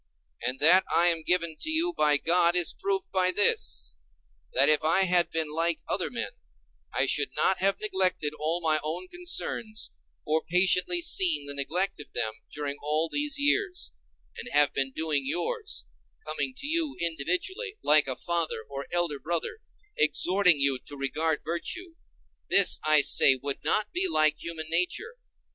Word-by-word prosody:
And 130 Hz, -, -3 dB
that 180 Hz, +5 st, +5 dB
I 175 Hz, +1 st, +4 dB
am 165 Hz, -1 st, 0 dB
given 170 Hz, -1 st, 0 dB
to 315 Hz, -, -3 dB
you 330 Hz, +3 st, +2 dB
by 150 Hz, -, +3 dB
God 170 Hz, +3 st, +1 dB
is 175 Hz, -3 st, +2 dB
proved 195 Hz, -1 st, -2 dB
by 185 Hz, -1 st, +2 dB
this: 80 Hz, -, 0 dB, 0.6 s
that 135 Hz, +2 st, +3 dB
if 155 Hz, +1 st, +3 dB
I 165 Hz, +5 st, +3 dB
had 180 Hz, -2 st, +5 dB
been 160 Hz, -2 st, -1 dB
like 165 Hz, +1 st, 0 dB
other -, -, -1 dB
men, -, -, -4 dB, 0.6 s
I -, -, 0 dB
should 430 Hz, -, 0 dB
not 190 Hz, -, +1 dB
have 195 Hz, +1 st, +3 dB
neglected 185 Hz, -7 st, 0 dB
all 160 Hz, +3 st, -1 dB
my 155 Hz, -2 st, +2 dB
own 170 Hz, +4 st, -5 dB
concerns, 350 Hz, -11 st, -1 dB, 0.3 s
or 155 Hz, +1 st, 0 dB
patiently 180 Hz, -, +2 dB
seen 170 Hz, -, +3 dB
the 145 Hz, -, -1 dB
neglect 155 Hz, +8 st, -3 dB
of 150 Hz, -, -10 dB
them 110 Hz, -1 st, -2 dB, 0.2 s
during 145 Hz, -1 st, -4 dB
all 155 Hz, +2 st, -1 dB
these 290 Hz, -, -1 dB
years, 360 Hz, +6 st, 0 dB, 0.4 s
and -, -, -8 dB
have 145 Hz, -1 st, +3 dB
been 135 Hz, -1 st, -1 dB
doing 155 Hz, +1 st, -1 dB
yours, 280 Hz, -, -3 dB, 0.4 s
coming 260 Hz, -, -4 dB
to 280 Hz, -, -6 dB
you 310 Hz, -2 st, 0 dB
individually, 180 Hz, -, -2 dB
like 150 Hz, -1 st, +4 dB
a 130 Hz, -, -2 dB
father 170 Hz, -9 st, -3 dB
or 140 Hz, 0 st, -7 dB
elder 175 Hz, -5 st, -1 dB
brother, 170 Hz, -, -3 dB, 0.4 s
exhorting 180 Hz, +1 st, +3 dB
you 140 Hz, -2 st, +2 dB
to 145 Hz, -, -11 dB
regard 150 Hz, +3 st, -1 dB
virtue; 250 Hz, -, -4 dB, 0.6 s
this, 200 Hz, -, +5 dB
I 155 Hz, -1 st, +4 dB
say, 135 Hz, -, +5 dB
would 140 Hz, +2 st, -4 dB
not 210 Hz, 0 st, -1 dB
be 365 Hz, +2 st, +1 dB
like 155 Hz, -, +1 dB
human 165 Hz, -2 st, -6 dB
nature. 180 Hz, -, -1 dB
170 Hz, 165 wpm, -27 LUFS, 150-195 Hz, 0.6 s, that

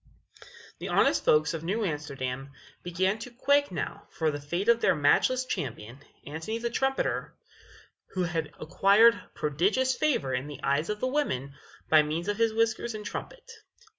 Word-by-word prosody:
The -, -, -5 dB
honest -, -, +3 dB
folks 150 Hz, +1 st, +4 dB
of 165 Hz, -1 st, -5 dB
New 205 Hz, +6 st, -1 dB
Amsterdam 140 Hz, -4 st, -4 dB, 0.3 s
began 190 Hz, +4 st, 0 dB
to 235 Hz, -, -7 dB
quake 285 Hz, +3 st, +2 dB
now 180 Hz, -, -5 dB
for 160 Hz, -2 st, -1 dB
the 145 Hz, 0 st, -5 dB
fate 170 Hz, +8 st, -3 dB
of 235 Hz, 0 st, +4 dB
their -, -, +3 dB
matchless 205 Hz, -, +3 dB
champion, 120 Hz, -, -5 dB, 0.3 s
Antony 160 Hz, +9 st, -4 dB
the 235 Hz, 0 st, -3 dB
Trumpeter, 270 Hz, +2 st, -1 dB, 0.8 s
who 185 Hz, -, +1 dB
had 165 Hz, -3 st, -2 dB
acquired 200 Hz, +8 st, +4 dB
prodigious 195 Hz, -, +1 dB
favor 250 Hz, -, 0 dB
in 125 Hz, +3 st, -2 dB
the 150 Hz, -, -9 dB
eyes 140 Hz, +4 st, +1 dB
of 210 Hz, 0 st, -3 dB
the 255 Hz, -, +1 dB
women 140 Hz, -, -1 dB, 0.3 s
by 155 Hz, -1 st, +6 dB
means 155 Hz, +4 st, -3 dB
of 205 Hz, 0 st, -1 dB
his 230 Hz, -1 st, +2 dB
whiskers 225 Hz, +1 st, 0 dB
and 210 Hz, -1 st, -7 dB
his -, -, -5 dB
trumpet. 485 Hz, -, -7 dB
175 Hz, 165 wpm, -28 LUFS, 150-230 Hz, 0.8 s, by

